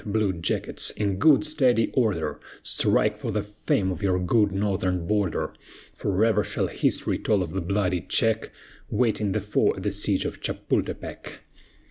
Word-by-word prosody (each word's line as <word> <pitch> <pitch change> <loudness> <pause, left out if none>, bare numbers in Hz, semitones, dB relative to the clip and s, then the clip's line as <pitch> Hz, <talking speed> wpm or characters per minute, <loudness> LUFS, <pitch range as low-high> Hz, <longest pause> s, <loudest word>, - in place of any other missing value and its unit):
blue 105 -2 0
jackets, 85 -1 -2
in 100 -3 -2
good 155 +4 +5
steady 130 -7 +2
order, 105 -10 0 0.2
Strike 105 0 +2
for 115 - -4
the 105 -1 -1
fame 105 -2 -1
of 90 - -5
your 95 -2 +2
good 100 +3 +2
northern 95 -3 -1
border; 100 -2 0 0.4
Forever 105 +2 +1
shall - - -2
history - - 0
tell 100 -3 +1
of 80 - -6
the 95 - -2
bloody 90 -1 0
check 110 +6 +1 0.4
Waiting 110 -5 +1
the 110 - 0
foe 105 +2 +1
at - - -7
the - - 0
siege - - 0
of - - -5
Chapultepec. - - -3
105 Hz, 155 wpm, -25 LUFS, 95-110 Hz, 0.4 s, good